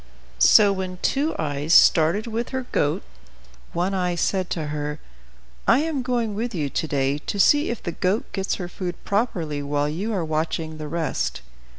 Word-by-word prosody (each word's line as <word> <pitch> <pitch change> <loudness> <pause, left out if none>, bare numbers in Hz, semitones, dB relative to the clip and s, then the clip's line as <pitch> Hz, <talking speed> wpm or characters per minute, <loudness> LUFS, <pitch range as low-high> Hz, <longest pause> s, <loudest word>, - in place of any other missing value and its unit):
So 200 - +7
when 185 -1 -4
Two 290 +4 +1
Eyes 150 +1 0
started 165 +6 +5
with 230 +1 -3
her 260 -1 -3
goat, 145 - 0 0.7
One 180 +3 -1
Eye 180 -2 0
said 185 +1 0
to 155 -3 -3
her, 150 0 -3 0.7
"I 250 +5 +5
am 310 -4 -1
going 240 -4 -1
with 225 +1 -3
you 145 -5 -2
to 160 - -1
day 140 0 0
to 200 - -4
see 290 - +5
if 235 - -4
the 170 - -2
goat 185 +6 0
gets 195 -1 -1
her 180 - -5
food 180 0 -5
properly 175 -9 -1
while 145 0 0
you 185 +9 -3
are 185 -6 -1
watching 160 0 -2
the 155 - -5
rest." 160 +1 -2
180 Hz, 180 wpm, -23 LUFS, 155-215 Hz, 0.7 s, So